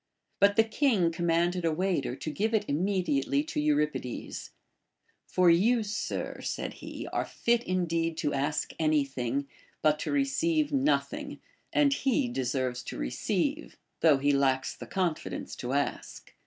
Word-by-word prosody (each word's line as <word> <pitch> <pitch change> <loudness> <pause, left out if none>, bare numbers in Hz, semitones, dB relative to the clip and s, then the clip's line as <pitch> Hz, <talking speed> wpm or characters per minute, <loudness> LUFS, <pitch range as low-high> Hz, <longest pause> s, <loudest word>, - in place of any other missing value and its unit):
But 200 0 +5
the 225 - +6
king 220 - +2
com 170 +1 -2
manded 175 +2 +2
a 165 - +2
waiter 175 -6 0
to 155 - -5
give 220 +7 0
it 215 - +1
immediately 150 -4 +1
to 150 - -4
Euripides: 150 -4 -1 0.8
For 180 -2 +4
you, 220 +7 +3
sir, 210 +1 -4
said - - -3
he, - - -7
are - - +1
fit 235 0 0
indeed 165 -3 0
to 145 - -1
ask 145 +2 -1
any 155 -3 +3
thing, 135 +1 -3 0.4
but 150 0 +3
to - - -3
re 280 -1 +3
ceive 305 +2 +1
nothing; 280 +1 0 0.3
and 285 -1 +4
he 270 0 +1
deserves 130 - -1
to - - -6
receive, - - -2 0.2
thougli 145 -4 +4
he 145 - +4
lacks 135 -1 +1
the - - -9
confidence 180 -5 -2
to 125 - -4
ask. 140 0 -3
165 Hz, 155 wpm, -29 LUFS, 140-215 Hz, 0.8 s, the